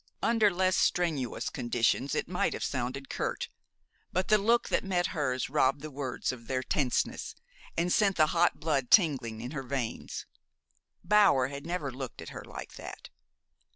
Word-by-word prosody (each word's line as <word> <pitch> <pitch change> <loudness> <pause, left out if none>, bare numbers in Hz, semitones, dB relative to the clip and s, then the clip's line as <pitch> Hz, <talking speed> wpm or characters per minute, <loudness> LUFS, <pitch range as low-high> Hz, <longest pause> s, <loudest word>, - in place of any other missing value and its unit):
Under 225 -2 +4
less 185 0 +1
strenuous 155 -9 0
conditions 120 +3 0
it - - -1
might - - 0
have - - -4
sounded 130 +2 -3
curt; - - -3 0.6
but 185 +1 -1
the 215 0 +6
look 230 +4 +2
that - - +1
met 180 -2 +1
hers 130 -5 -1
robbed 135 0 +2
the 155 +1 -7
words 135 -3 -2
of 115 -3 -10
their 130 -1 -1
tenseness, 130 -1 -1 0.4
and 175 +1 +2
sent 200 -4 +3
the 155 - +5
hot 175 0 +3
blood 140 -6 0
tingling 130 - +4
in 120 - -5
her 145 -3 -3
veins. 130 -3 -4 0.8
Bower 185 -10 +5
had 140 +2 -7
never 170 -6 -2
looked 130 0 -7
at - - -7
her - - -8
like - - -9
that. - - -9
140 Hz, 165 wpm, -30 LUFS, 130-180 Hz, 0.8 s, the